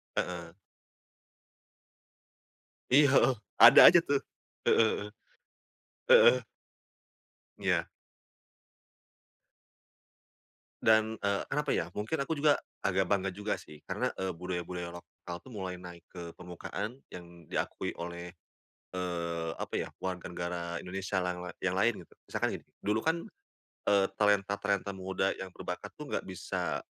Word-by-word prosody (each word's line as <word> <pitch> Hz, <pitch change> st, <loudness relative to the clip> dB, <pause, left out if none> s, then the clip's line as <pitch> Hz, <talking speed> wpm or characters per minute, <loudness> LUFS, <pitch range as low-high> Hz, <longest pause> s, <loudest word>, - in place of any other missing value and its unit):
Heeh. 85 Hz, -1 st, -3 dB, 2.4 s
Iya, 145 Hz, +2 st, +8 dB
heeh. 135 Hz, -, +5 dB, 0.2 s
Ada -, -, +10 dB
aja -, -, +9 dB
tuh. -, -, +3 dB, 0.5 s
Heeh -, -, +5 dB, 0.2 s
heeh. 105 Hz, -, -6 dB, 1.0 s
Heeh. 485 Hz, 0 st, +7 dB, 1.1 s
Iya. -, -, +1 dB, 3.0 s
Dan, 110 Hz, 0 st, +4 dB
eee, 100 Hz, -1 st, +1 dB
kenapa 150 Hz, 0 st, -1 dB
ya, 80 Hz, -, 0 dB
mungkin 110 Hz, +10 st, -2 dB
aku 140 Hz, +4 st, -1 dB
juga 145 Hz, 0 st, +3 dB, 0.2 s
agak 95 Hz, -1 st, +2 dB
bangga 95 Hz, -1 st, +1 dB
juga 105 Hz, +3 st, -2 dB
sih, 75 Hz, -, -13 dB
karena, -, -, -1 dB
eee, 95 Hz, 0 st, -1 dB
budaya-budaya 90 Hz, 0 st, -4 dB
lokal 85 Hz, 0 st, -10 dB
tuh 130 Hz, -, -13 dB
mulai 95 Hz, -4 st, -5 dB
naik 90 Hz, -2 st, -11 dB
ke 85 Hz, -2 st, -8 dB
permukaan 90 Hz, +7 st, -6 dB
yang 85 Hz, -2 st, -12 dB
diakui -, -, -3 dB
oleh, 85 Hz, +1 st, -7 dB, 0.6 s
eee, 85 Hz, -2 st, -2 dB
apa -, -, -5 dB
ya, -, -, -2 dB
warga 90 Hz, -1 st, -4 dB
negara 85 Hz, 0 st, -3 dB, 0.2 s
Indonesia 95 Hz, +1 st, -3 dB
yang 90 Hz, -1 st, -2 dB
lai 90 Hz, -, -7 dB
yang 95 Hz, -1 st, -1 dB
lain 115 Hz, +5 st, +3 dB
gitu. -, -, -22 dB, 0.2 s
Misalkan -, -, 0 dB
gini, -, -, -24 dB, 0.2 s
dulu 105 Hz, +2 st, 0 dB
kan, 160 Hz, +1 st, +2 dB, 0.7 s
eee, 100 Hz, -1 st, +4 dB
talenta-talenta 100 Hz, -1 st, +1 dB
muda 95 Hz, 0 st, -1 dB
yang 95 Hz, -1 st, -7 dB
berbakat 90 Hz, +3 st, -6 dB
tuh 150 Hz, -1 st, -9 dB
nggak -, -, -2 dB
bisa, 95 Hz, -2 st, -3 dB
95 Hz, 125 wpm, -31 LUFS, 90-105 Hz, 3.0 s, Ada